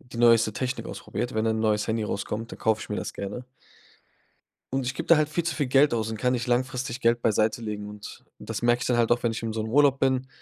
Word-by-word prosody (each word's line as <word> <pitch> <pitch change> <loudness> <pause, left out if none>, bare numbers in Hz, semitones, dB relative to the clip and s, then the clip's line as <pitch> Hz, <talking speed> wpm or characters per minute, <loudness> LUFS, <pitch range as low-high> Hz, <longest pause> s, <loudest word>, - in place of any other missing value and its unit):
die 120 -1 -13
neueste 115 -2 +5
Technik 130 +4 -3
ausprobiert 120 - -5
wenn 110 +1 0
ein 110 0 +1
neues 105 -1 +1
Handy 110 0 0
rauskommt, 105 +2 -4
dann - - -8
kaufe 110 -1 +1
ich - - -10
mir 105 - -1
das - - -4
gerne. 100 +5 -5 1.3
Und 135 -1 0
ich 130 - -2
gib 165 - -5
da 170 - +7
halt 155 -1 +1
viel 170 +3 -1
zu 170 -4 -1
viel 145 -4 -1
Geld 135 +1 +4
aus 110 -1 -1
und 110 - -4
kann 125 +3 +1
nicht 120 -2 -1
langfristig 125 0 -1
Geld 120 -1 +2
beiseitelegen 110 -1 0
und 105 0 -10
das - - -5
merke 120 0 +2
ich - - -2
dann 125 - +2
halt 120 -1 +2
auch, 120 - -5
wenn 120 - +2
ich 115 - -5
in 115 -1 -3
so 110 - -2
'nem 110 - -5
Urlaub 140 0 +4
bin, 130 -1 +1
120 Hz, 260 wpm, -26 LUFS, 110-130 Hz, 1.3 s, da